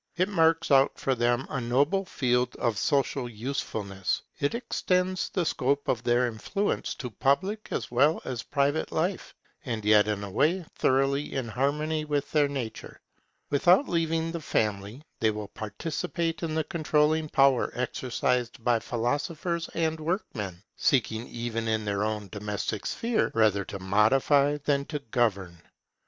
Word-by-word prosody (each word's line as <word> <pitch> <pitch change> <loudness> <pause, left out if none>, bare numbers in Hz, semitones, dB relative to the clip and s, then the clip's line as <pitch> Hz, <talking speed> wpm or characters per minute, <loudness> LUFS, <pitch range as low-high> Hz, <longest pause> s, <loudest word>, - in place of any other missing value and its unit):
It 185 +2 +2
marks 165 -4 +2
out 135 0 +5
for 135 - 0
them 120 +1 +1
a 140 - -3
noble 145 +11 +1
field 125 -7 0
of 115 -4 -1
social 140 -3 0
usefulness. 105 -5 -3 0.2
It 145 +9 0
extends 185 -6 0
the 180 -3 -1
scope 140 -1 0
of 120 - 0
their 120 +1 +2
influence 125 - -2
to 125 -5 -6
public 190 - 0
as - - -3
well 140 +6 +3
as 125 -2 -3
private 145 +3 0
life, 175 +4 -2 0.3
and 115 -5 -4
yet 105 0 +5
in 105 -1 -2
a 100 - -6
way 160 - +1
thoroughly 135 +2 +1
in 130 -3 -2
harmony 150 +6 0
with 145 -2 -2
their 150 -2 +3
nature. 130 -6 -6 0.5
Without 175 - +4
leaving 165 -1 0
the 170 -1 -5
family, 105 +1 -2 0.2
they 110 - +3
will 105 -1 -4
participate 160 - -3
in 160 -2 -2
the 160 - +1
controlling 155 -1 +1
power 135 -3 +4
exercised 125 -1 -1
by 120 -1 +3
philosophers 145 +9 -2
and 160 -1 0
workmen, 110 - -3
seeking 115 -4 +1
even 115 -1 -3
in 110 -1 0
their 100 0 0
own 105 -1 -2
domestic 105 +1 -3
sphere 230 -1 0
rather 105 -3 +3
to 100 - -6
modify 135 +9 +3
than 140 -1 +2
to 150 - -4
govern. 95 -8 0
135 Hz, 150 wpm, -27 LUFS, 110-155 Hz, 0.5 s, out